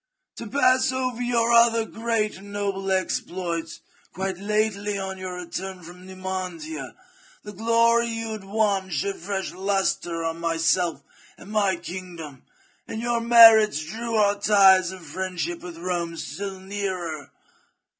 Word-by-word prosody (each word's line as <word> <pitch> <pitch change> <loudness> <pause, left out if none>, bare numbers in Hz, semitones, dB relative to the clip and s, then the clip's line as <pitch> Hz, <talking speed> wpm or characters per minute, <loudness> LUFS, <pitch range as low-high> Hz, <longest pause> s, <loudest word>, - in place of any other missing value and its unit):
To 230 - -6
pass 255 +2 +3
over 255 -2 -2
your 235 -1 +1
other 230 -1 +5
great 225 -2 -2
and 200 +1 -12
noble 195 -1 -2
exploits, 175 -3 -2 0.3
quite 190 -1 -4
lately 205 0 -1
on 190 -1 -5
your 185 -1 -5
return 180 +1 -6
from 180 +2 -12
Numantia, 190 - -6 0.5
the 210 - -9
glory 230 +2 +3
you 225 -1 -4
had 215 -2 -6
won 200 -2 0
shed 185 +5 -2
fresh 195 +2 -4
lustre 190 -3 -1
on 165 0 -3
myself 165 -1 0 0.3
and 200 - -12
my 200 -3 +2
kingdom, 170 -5 -8 0.5
and 220 - -5
your 235 0 0
merits 225 -8 +7
drew 230 +7 -4
our 205 -1 +3
ties 190 -3 +5
of 185 -3 -11
friendship 175 +1 -4
with 175 -2 -9
Rome 170 -1 -3
still 195 +1 -6
nearer. 185 -6 -4
195 Hz, 135 wpm, -24 LUFS, 180-220 Hz, 0.5 s, merits